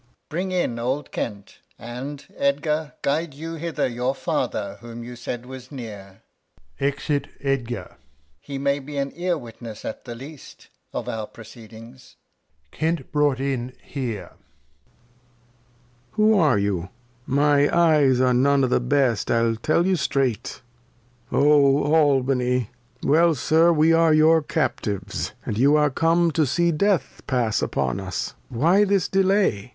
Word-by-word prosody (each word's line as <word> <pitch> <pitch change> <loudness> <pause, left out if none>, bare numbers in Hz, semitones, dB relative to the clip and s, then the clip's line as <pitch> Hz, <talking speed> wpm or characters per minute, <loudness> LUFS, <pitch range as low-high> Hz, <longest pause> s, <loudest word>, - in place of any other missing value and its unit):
Alh. 120 - -36 0.2
Bring 180 +4 -3
in 175 -10 -1
old 130 +5 -2
Kent; 100 -3 -5 0.2
and, 135 +5 -7
Edgar, 150 +2 0
guide 150 +1 -1
you 165 +3 -6
hither 165 0 -2
Your 125 +2 -1
Father, 100 -6 -2
whom 120 0 -8
you 120 +1 -8
said 120 0 -6
was 130 0 -10
near, 105 -7 -9 0.6
[Exit 140 +1 -1
Edgar. 130 -4 -3 0.4
He 140 - -7
may 140 +1 0
be 145 +1 -8
an 140 0 -1
Ear 175 0 -1
Witness 115 -4 -10
as - - -4
the 120 - -7
least 140 +4 -12 0.2
Of - - -5
our 110 -1 -4
Proceedings. 115 +2 -14 0.6
[Kent 160 +1 -2
hf 150 - 0
ought 145 -3 +2
in 130 -2 -2
here. 120 -8 -5
Lear. - - -23 1.8
Who 215 -1 +4
are 150 - +4
you? 95 -3 -1 0.4
My 145 +1 +3
Eyes 150 -7 +4
are 130 -1 +3
none 135 +2 +3
o'th 125 -1 0
Best, 130 -7 +2
I'll 115 -1 +2
teU 155 +9 +1
you 190 +1 +2
streight; 135 -6 -1 0.7
Oh 145 0 +4
Albany 130 -5 +2
\ 120 +1 -27
Well, 165 +2 +4
Sir, 160 +5 +4
we 160 0 +4
are 165 -1 +4
your 160 +1 +5
Captives, 105 - -2
And 105 - -3
you 140 +4 +5
are 150 -1 +3
come 165 +3 +2
to 155 -1 +1
see 170 +6 +2
Death 195 +3 0
pass 120 -5 +1
upon 70 +6 -1
us. 95 -2 -4 0.2
Why 165 - +3
this 200 -3 +2
Delay. 190 - +1
140 Hz, 145 wpm, -23 LUFS, 120-155 Hz, 1.8 s, your